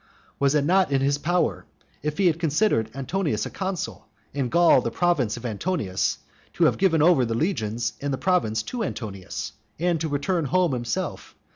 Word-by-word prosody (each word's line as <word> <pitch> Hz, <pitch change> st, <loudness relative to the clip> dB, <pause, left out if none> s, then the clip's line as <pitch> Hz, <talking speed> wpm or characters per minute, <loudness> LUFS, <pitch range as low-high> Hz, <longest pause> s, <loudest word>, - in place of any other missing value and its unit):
Was 140 Hz, +1 st, +3 dB
it 145 Hz, -1 st, +2 dB
not 185 Hz, -1 st, +3 dB
in 135 Hz, -, +3 dB
his 140 Hz, +1 st, +1 dB
power, 175 Hz, +3 st, 0 dB, 0.4 s
if 150 Hz, +1 st, -3 dB
he 195 Hz, -, +2 dB
had 170 Hz, -2 st, +3 dB
considered 155 Hz, -, +1 dB
Antonius 140 Hz, -, -1 dB
a -, -, -6 dB
consul, 190 Hz, -, -4 dB, 0.3 s
and 135 Hz, -3 st, -1 dB
Gaul 170 Hz, -4 st, +5 dB
the 115 Hz, -, -2 dB
province 135 Hz, -5 st, +1 dB
of 120 Hz, -, -9 dB
Antonius, 110 Hz, -, -1 dB, 0.4 s
to -, -, +1 dB
have -, -, +3 dB
given 165 Hz, -5 st, +3 dB
over 165 Hz, -6 st, +5 dB
the 115 Hz, -1 st, -1 dB
legions 115 Hz, -, -1 dB
and 145 Hz, 0 st, -2 dB
the 135 Hz, -, -1 dB
province 115 Hz, -, +1 dB
to 240 Hz, -, -4 dB
Antonius? 100 Hz, -, -5 dB, 0.3 s
and 170 Hz, -1 st, 0 dB
to 160 Hz, -, -1 dB
return 150 Hz, +4 st, 0 dB
home 180 Hz, +2 st, +2 dB
himself? 120 Hz, -2 st, -4 dB
145 Hz, 180 wpm, -25 LUFS, 120-175 Hz, 0.4 s, Gaul